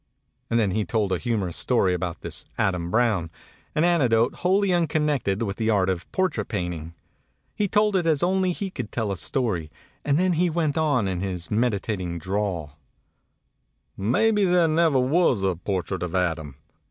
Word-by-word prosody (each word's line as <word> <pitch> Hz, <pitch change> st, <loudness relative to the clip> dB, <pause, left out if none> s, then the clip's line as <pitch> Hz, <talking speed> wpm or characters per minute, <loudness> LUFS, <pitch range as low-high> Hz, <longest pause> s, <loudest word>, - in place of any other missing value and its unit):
And 115 Hz, -, +2 dB
then 105 Hz, -4 st, +1 dB
he 105 Hz, +3 st, 0 dB
told 105 Hz, -3 st, -1 dB
a 90 Hz, -, 0 dB
humorous 105 Hz, -8 st, -1 dB
story 100 Hz, -7 st, +2 dB
about 90 Hz, -1 st, -3 dB
this -, -, -4 dB
Adam 90 Hz, -3 st, 0 dB
Brown, 110 Hz, -6 st, +1 dB, 0.5 s
an 155 Hz, -, +2 dB
anecdote 125 Hz, -9 st, +2 dB
wholly 190 Hz, +1 st, +2 dB
unconnected 150 Hz, -, 0 dB
with 100 Hz, -3 st, -3 dB
the 110 Hz, -1 st, 0 dB
art 100 Hz, -4 st, +2 dB
of 90 Hz, -2 st, -3 dB
portrait 185 Hz, -, -1 dB
painting. 85 Hz, -5 st, -4 dB, 0.6 s
He 205 Hz, -, 0 dB
told 210 Hz, +1 st, +2 dB
it 175 Hz, -3 st, +1 dB
as 155 Hz, -2 st, +2 dB
only 185 Hz, +1 st, +2 dB
he 195 Hz, +2 st, -4 dB
could 125 Hz, -, -6 dB
tell 110 Hz, -4 st, -2 dB
a -, -, -1 dB
story; 90 Hz, -, -1 dB, 0.3 s
and 145 Hz, 0 st, +2 dB
then 185 Hz, +1 st, +2 dB
he 175 Hz, +2 st, +2 dB
went 155 Hz, -3 st, 0 dB
on 145 Hz, -9 st, +1 dB
in 90 Hz, -2 st, -2 dB
his 90 Hz, -3 st, -3 dB
meditating 100 Hz, -6 st, -1 dB
drawl: 90 Hz, -5 st, -3 dB, 1.2 s
"Maybe 205 Hz, -, +2 dB
there 175 Hz, -2 st, +4 dB
never 160 Hz, -2 st, +3 dB
was 130 Hz, -, +2 dB
a 95 Hz, -2 st, +1 dB
portrait 95 Hz, +1 st, -3 dB
of 90 Hz, 0 st, -3 dB
Adam. 80 Hz, -6 st, -1 dB
110 Hz, 170 wpm, -24 LUFS, -, 1.2 s, there